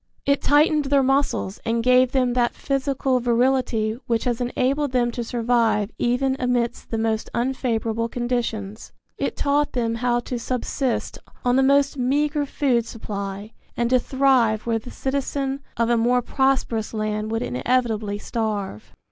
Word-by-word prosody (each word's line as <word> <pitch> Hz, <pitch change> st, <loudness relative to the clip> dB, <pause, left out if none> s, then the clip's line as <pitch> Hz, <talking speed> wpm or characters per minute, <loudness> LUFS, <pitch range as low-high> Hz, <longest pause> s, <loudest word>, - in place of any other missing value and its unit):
It 280 Hz, 0 st, +2 dB
tightened 295 Hz, 0 st, +3 dB
their 275 Hz, 0 st, +3 dB
muscles 270 Hz, -7 st, 0 dB
and 230 Hz, 0 st, 0 dB
gave 255 Hz, 0 st, +4 dB
them 255 Hz, -2 st, +1 dB
that 240 Hz, -1 st, +1 dB
physical 270 Hz, -1 st, 0 dB
virility 240 Hz, -2 st, +1 dB
which 230 Hz, -1 st, 0 dB
has 245 Hz, -1 st, -1 dB
enabled 260 Hz, +3 st, 0 dB
them 240 Hz, -1 st, +2 dB
to 240 Hz, 0 st, -4 dB
survive 230 Hz, -2 st, +1 dB
even 260 Hz, +2 st, +1 dB
amidst 245 Hz, -2 st, -1 dB
the 225 Hz, -, -2 dB
most 220 Hz, 0 st, -1 dB
unfavorable 230 Hz, -2 st, -1 dB
conditions. 230 Hz, -4 st, -3 dB, 0.3 s
It -, -, -2 dB
taught 290 Hz, +1 st, +1 dB
them 230 Hz, -2 st, 0 dB
how 240 Hz, +1 st, +1 dB
to 245 Hz, 0 st, -4 dB
subsist 255 Hz, +2 st, -2 dB, 0.3 s
on 245 Hz, 0 st, +3 dB
the 265 Hz, -, +4 dB
most 280 Hz, +1 st, +3 dB
meagre 290 Hz, +3 st, +1 dB
food 250 Hz, -6 st, +1 dB
supply 200 Hz, -1 st, -6 dB, 0.3 s
and 235 Hz, 0 st, 0 dB
to 255 Hz, -, +5 dB
thrive 255 Hz, -5 st, +2 dB
where 230 Hz, -1 st, 0 dB
the 235 Hz, -, -11 dB
citizen 275 Hz, 0 st, -2 dB, 0.2 s
of 230 Hz, +1 st, +1 dB
a 235 Hz, -, +3 dB
more 245 Hz, +2 st, +2 dB
prosperous 255 Hz, -5 st, 0 dB
land 215 Hz, 0 st, -2 dB
would 225 Hz, 0 st, -1 dB
inevitably 215 Hz, -, 0 dB
starve. 205 Hz, -, -4 dB
245 Hz, 150 wpm, -23 LUFS, 225-265 Hz, 0.3 s, to